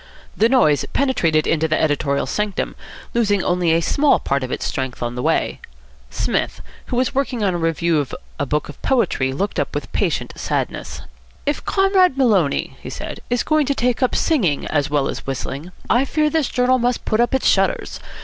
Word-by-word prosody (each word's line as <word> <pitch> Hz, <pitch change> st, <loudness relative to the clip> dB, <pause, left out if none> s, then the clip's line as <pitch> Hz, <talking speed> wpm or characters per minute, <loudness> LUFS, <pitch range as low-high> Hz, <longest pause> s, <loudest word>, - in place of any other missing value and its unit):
The 225 Hz, -, +3 dB
noise 155 Hz, -, +4 dB
penetrated 170 Hz, -, +2 dB
into 160 Hz, 0 st, +1 dB
the 155 Hz, -, +1 dB
editorial 145 Hz, -2 st, +1 dB
sanctum, 210 Hz, -1 st, -2 dB, 0.4 s
losing 205 Hz, -5 st, +2 dB
only 175 Hz, -2 st, +1 dB
a 165 Hz, +1 st, +3 dB
small 285 Hz, -, +3 dB
part 140 Hz, 0 st, -1 dB
of 130 Hz, -, -4 dB
its -, -, -3 dB
strength 130 Hz, -2 st, -3 dB
on 120 Hz, 0 st, -2 dB
the 125 Hz, -, -4 dB
way. -, -, 0 dB, 0.5 s
Psmith, -, -, -1 dB, 0.3 s
who -, -, -3 dB
was 250 Hz, +1 st, +2 dB
at -, -, -17 dB
work 275 Hz, +1 st, 0 dB
on 230 Hz, -3 st, -2 dB
a -, -, -1 dB
review 165 Hz, 0 st, +1 dB
of 140 Hz, -, -3 dB, 0.2 s
a 140 Hz, -, -1 dB
book 150 Hz, +2 st, -1 dB
of 145 Hz, -, -11 dB
poetry, 235 Hz, -, +1 dB
looked 195 Hz, +10 st, -2 dB
up -, -, -2 dB
with -, -, -4 dB
patient -, -, -1 dB
sadness. -, -, -3 dB, 0.4 s
"If 290 Hz, +1 st, -1 dB
Comrade 385 Hz, -6 st, +3 dB
Maloney," 205 Hz, -, +2 dB
he -, -, -7 dB
said, -, -, -6 dB
"is 245 Hz, 0 st, +1 dB
going 310 Hz, -3 st, +2 dB
to 280 Hz, -, +1 dB
take 245 Hz, -2 st, 0 dB
to 255 Hz, -, +3 dB
singing 200 Hz, -, +1 dB
as 145 Hz, -2 st, 0 dB
well 145 Hz, -2 st, +1 dB
as -, -, -6 dB
whistling, 140 Hz, +5 st, -4 dB, 0.2 s
I 245 Hz, +4 st, +3 dB
fear 305 Hz, +2 st, +1 dB
this 315 Hz, -4 st, +1 dB
journal 255 Hz, +1 st, +2 dB
must 245 Hz, 0 st, 0 dB
put 215 Hz, -, 0 dB
up 240 Hz, +2 st, +2 dB
its 265 Hz, -, +1 dB
shutters. -, -, +1 dB
205 Hz, 195 wpm, -20 LUFS, -, 0.5 s, noise